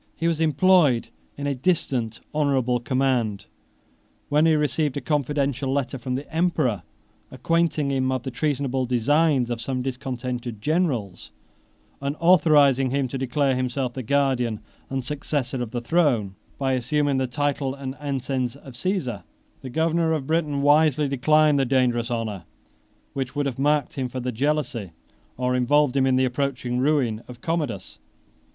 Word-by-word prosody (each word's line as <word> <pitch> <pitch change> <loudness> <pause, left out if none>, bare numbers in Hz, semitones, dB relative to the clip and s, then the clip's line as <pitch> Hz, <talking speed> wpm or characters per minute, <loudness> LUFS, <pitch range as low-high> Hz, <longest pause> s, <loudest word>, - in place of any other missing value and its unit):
He 165 - -1
was 165 -1 0
employed 155 -5 +3 0.3
in 140 - -4
a 140 - 0
distant 130 -6 -1
honorable 135 -5 +1
command, 120 -4 0 0.8
when 150 +2 +4
he 160 - +4
received 150 -1 0
a - - 0
confidential 140 -3 -1
letter 135 -1 -2
from 125 +1 -3
the 140 +3 -5
emperor, 155 - +1 0.5
acquainting 165 -4 0
him 130 -1 0
of 130 -2 -2
the 130 - -4
treasonable 135 -1 -1
designs 130 +1 +2
of 115 -1 -3
some 130 +1 -3
discontented 125 -3 -4
generals, 130 - -1 0.7
and 140 +1 -2
authorizing 145 -6 +5
him 135 0 0
to 135 - -4
declare 135 +1 +1
himself 130 0 -2
the 130 - -4
guardian 125 -4 0 0.3
and 135 -2 -3
successor 140 -2 -2
of 120 - -3
the 120 +1 -4
throne, 120 - +1 0.2
by 135 -1 0
assuming 140 +3 +1
the 130 -1 0
title 140 +1 -1
and 135 -1 -5
ensigns 135 -3 -2
of 135 -2 -12
Cæsar. 165 -1 -2
18 - - -19 0.4
The 130 - -7
governor 160 +3 +1
of 150 -4 -2
Britain 150 -2 0
wisely 150 0 +4
declined 150 +2 +3
the - - +3
dangerous 125 -2 +1
honor, 110 -7 -3 0.7
which 135 0 -4
would 145 0 0
have 135 -2 -3
marked 145 +1 +1
him 130 -3 -3
for 130 - -5
the 125 0 -2
jealousy, 125 - -1 0.4
or 125 0 0
involved 140 +2 +3
him 135 -1 +3
in 130 - +3
the 130 0 +3
approaching 125 -1 -2
ruin, 130 -6 +1
of 125 -1 -11
Commodus. 150 - -3
135 Hz, 160 wpm, -24 LUFS, 125-150 Hz, 0.8 s, authorizing